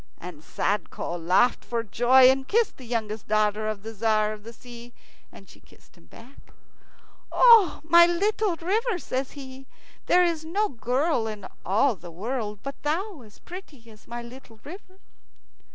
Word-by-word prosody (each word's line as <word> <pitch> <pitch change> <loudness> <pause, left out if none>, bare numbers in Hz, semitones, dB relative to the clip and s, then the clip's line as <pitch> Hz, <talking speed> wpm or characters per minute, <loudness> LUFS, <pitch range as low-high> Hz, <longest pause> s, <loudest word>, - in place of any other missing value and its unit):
And 175 -4 -10
Sadko 195 -3 -3
laughed 185 +9 +2
for 235 -1 -3
joy, 245 +4 +5
and 265 0 -3
kissed 455 +1 +1
the 255 - -12
youngest 220 -3 -4
daughter 215 0 +1
of 215 -2 -4
the 225 +1 -7
Tzar 215 0 +1
of 215 - -11
the 230 - -9
Sea, 240 0 -13 0.4
and 195 - -15
she - - -17
kissed - - -23
him 85 - -22
back. 245 - -17 0.8
"O 460 -7 +6
my 340 +2 +6
little 395 +2 0
river!" 410 +6 -1
says 265 -5 -4
he; 265 -2 -11 0.4
"there 360 - +5
is 330 -2 -2
no 400 +7 -1
girl 250 +1 -1
in 210 -3 -7 0.2
all 220 +6 +2
the 175 -1 -12
world 210 +4 -4
but 275 0 -7
thou 330 +2 -3
as 215 -3 -17
pretty 295 -11 -12
as 215 0 -19
my 240 0 -6
little 235 -2 -14
river." 370 +3 -12
245 Hz, 165 wpm, -25 LUFS, 215-330 Hz, 0.8 s, O